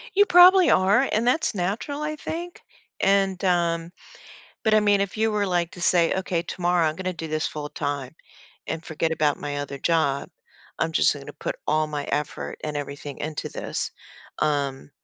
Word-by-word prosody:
You 410 +1 +5
probably 360 0 +8
are 200 +8 +4
and 220 +2 +1
that's 250 -2 +1
natural 205 +11 -2
I 305 0 -2
think 340 +3 -6 0.4
and 195 -1 +2
um, 170 -2 +1 0.7
but 220 -1 +3
I - - +7
mean 205 -1 +3
if 200 0 -2
you 220 0 +2
were 205 -1 +1
like 175 -2 0
to 180 - -10
say, 170 -1 +3
"Okay, 185 -3 -1
tomorrow 175 -1 +1
I'm 155 0 -1
gonna 185 0 -3
do 160 -1 -6
this 155 0 -1
full 150 -1 -5
time 140 -1 -4 0.5
and 160 +1 -4
forget 160 +1 -2
about 150 -2 +1
my 145 -1 -4
other 140 -1 -5
job, 150 -4 +1 0.5
I'm 165 0 0
just - - +3
gonna 145 0 -9
put - - -5
all 155 +1 +2
my 150 -1 -4
effort 150 0 -3
and 150 -1 -3
everything 145 0 -6
into 155 0 -4
this." - - -4 0.5
Um, 140 -2 -1
170 Hz, 180 wpm, -24 LUFS, 150-200 Hz, 0.7 s, probably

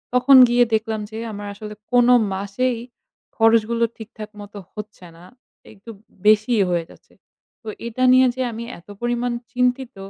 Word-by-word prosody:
তখন 255 +2 +6
গিয়ে 245 0 +4
দেখলাম 220 0 -1
যে, 220 - -7
আমার 205 0 -7
আসলে 210 +1 -9 0.2
কোনো 245 0 +5 0.2
মাসেই 215 +6 -2 0.6
খরচগুলো 225 +1 +2
ঠিকঠাক 220 -1 -10
মতো 205 0 -11 0.2
হচ্ছে 210 -3 -10
না, 170 - -16 0.5
একটু 215 +2 -16 0.4
বেশিই 215 +1 +4
হয়ে 175 -1 0
যাচ্ছে। - - -20 0.5
তো - - -15 0.2
এটা 235 +2 -3
নিয়ে 255 0 +6
যে 260 - -4
আমি 230 +1 -7 0.2
এতো 175 +4 -15
পরিমাণ 240 0 -1 0.2
চিন্তিত, 250 +1 -1
225 Hz, 150 wpm, -21 LUFS, 210-245 Hz, 0.6 s, তখন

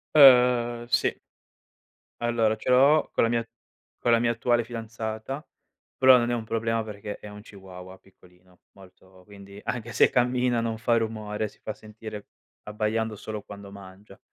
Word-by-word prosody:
Ehm, 125 -4 +6
sì. - - +1 1.1
Allora, 115 -2 +1
ce 110 - -6
l'ho 140 +5 +5
con - - +2
la 115 - +2
mia 115 0 0 0.5
con 120 - +1
la 115 - +5
mia 115 0 +1
attuale 120 +1 +1
fidanzata, 115 +3 -6 0.5
però 130 -1 +7
non 120 -1 0
è - - 0
un 120 -2 -2
problema 115 0 -1
perché 105 -1 -7
è - - -11
un 105 0 -10
chihuahua 95 -2 -12
piccolino, 90 -1 -24
molto, 95 -1 -19
quindi 100 0 -13
anche 120 -1 -4
se - - +5
cammina, 125 -1 +1
non 115 -1 -3
fa 120 +1 +1
rumore, 110 -1 -3
si - - -24
fa 110 - -5
sentire 110 -1 -10 0.4
abbaiando 110 +1 -2
solo 105 +1 -6
quando 100 0 -11
mangia. 100 0 -14
110 Hz, 160 wpm, -26 LUFS, 105-120 Hz, 1.1 s, però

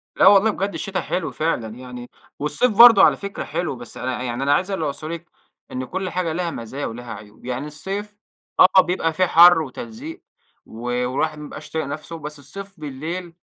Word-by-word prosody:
لا - - +5
والله 205 +2 +6
بجد 195 0 -3
الشتا 195 -1 -3
حلو 180 - -3
فعلًا 120 -9 -2
يعني 125 -1 -9 0.3
والصيف 150 - +1
برضه 235 -4 +10
على - - +5
فكرة 200 0 -5
حلو، 175 -6 -3
بس 120 -2 -10
أنا 130 - -3
يعني 130 - -3
ع - - -2
اللي 130 +3 -3
أنا 140 +1 +3
عايز 185 +6 0
اللي 175 -5 -1
أوصله 150 +2 -4
لِك 170 0 -8 0.4
إن 130 0 -4
كل 185 +6 -4
حاجة 175 -3 -2
ليها 175 0 -2
مزايا 125 +4 -5
وليها 120 +1 -6
عيوب. 105 +2 -13
يعني 125 +3 -3
الصيف 195 +7 -5 0.4
آه. 190 0 +8
بيبقى 175 -3 -1
فيه 185 +3 +2
حر 175 0 +7
وتلزيق 235 - -8 0.4
و 115 +1 -11
والواحد 125 +5 -1
ما 150 - -7
يبقاش 150 +1 -10
طايق 160 -2 -2
نفسه، 150 +4 -6
بس 150 0 -8
الصيف 195 +7 -10
بالليل 160 +5 -6
160 Hz, 200 wpm, -22 LUFS, 130-190 Hz, 0.4 s, برضه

